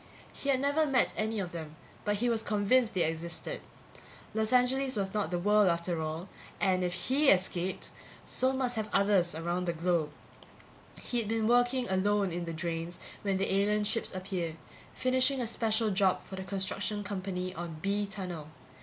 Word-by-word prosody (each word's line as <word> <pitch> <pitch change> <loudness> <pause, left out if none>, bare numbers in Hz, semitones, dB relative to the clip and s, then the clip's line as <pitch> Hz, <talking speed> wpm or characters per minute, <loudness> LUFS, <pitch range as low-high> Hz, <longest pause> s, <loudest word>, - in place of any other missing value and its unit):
He 280 - -4
had 265 -2 +3
never 285 +3 +2
met 265 -3 +2
any 220 0 -1
of 180 -3 -3
them, 160 -2 -7 0.3
but 205 0 +2
he 235 +4 0
was 230 -2 +2
convinced 215 +2 +2
they 180 - +3
existed. 165 +1 -3 0.7
Los 220 0 +1
Angeles 255 +1 +3
was 195 -2 -2
not 210 -6 0
the 175 - -1
world, 210 +3 +4
after 170 -1 0
all, 160 +3 -4 0.3
and 185 -1 +2
if 180 - 0
he 275 +8 +2
escaped 185 -1 +1 0.3
so 260 +1 +2
must 255 -3 0
have 215 -1 -2
others 195 -4 +3
around 175 +2 -2
the 170 - 0
globe. 170 -2 +1 0.9
He'd 235 -3 -2
been 220 0 0
working 245 +1 +3
alone 200 0 +1
in 175 +1 -3
the 165 - -4
drains 165 +1 -3 0.2
when 195 -2 0
the 195 0 0
alien 210 +2 +2
ships 220 +2 +1
appeared, 185 -4 -3 0.4
finishing 255 +1 +2
a 245 - 0
special 225 -1 +1
job 190 -1 +2
for 190 - -8
the 190 - -5
construction 195 +2 -2
company 185 -2 -3
on 170 -2 -6
B 200 +1 0
tunnel. 180 -6 -6
200 Hz, 175 wpm, -31 LUFS, 175-225 Hz, 0.9 s, world